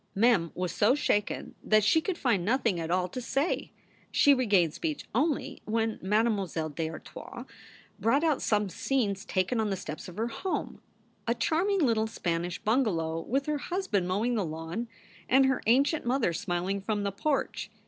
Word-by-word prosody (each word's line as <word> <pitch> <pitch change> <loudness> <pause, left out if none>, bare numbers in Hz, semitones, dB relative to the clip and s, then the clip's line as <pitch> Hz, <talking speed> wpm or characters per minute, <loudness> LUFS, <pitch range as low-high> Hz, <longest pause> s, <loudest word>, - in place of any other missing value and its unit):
Mem 200 -6 +3
was 180 -1 -2
so 225 +6 +3
shaken 210 -8 -1
that 215 -1 +4
she 320 +10 +4
could 370 0 -2
find 230 - +1
nothing 225 -3 +1
at 165 -1 -4
all 180 +1 +1
to 250 +8 -6
say. 275 +7 -1 0.4
She 285 - +5
regained 200 - +3
speech 310 -3 -3
only 285 +5 0
when 225 0 -1
Mademoiselle 195 -6 0
d 160 +2 -3
Artoise 160 - -9 0.5
brought 275 +7 +2
out 310 -4 +2
some 210 -2 +1
scenes 200 0 -1
taken 185 +6 0
on 215 -1 +1
the 195 - 0
steps 155 -4 -7
of 180 +1 -10
her 230 +2 -1
home 365 - -4 0.5
a 235 - +2
charming 360 - +1
little 220 -2 +2
Spanish 175 -4 -2
bungalow, 185 -9 0
with 270 +10 -1
her 300 -1 -1
husband 280 - -1
mowing 210 +7 0
the 215 -4 +1
lawn 165 +7 -4 0.4
and 265 +2 +6
her 265 0 +1
ancient 280 +6 +3
mother 245 -7 +1
smiling 180 +3 -2
from 205 0 -1
the 200 - -1
porch. 275 +9 -1
220 Hz, 170 wpm, -29 LUFS, 185-265 Hz, 0.5 s, and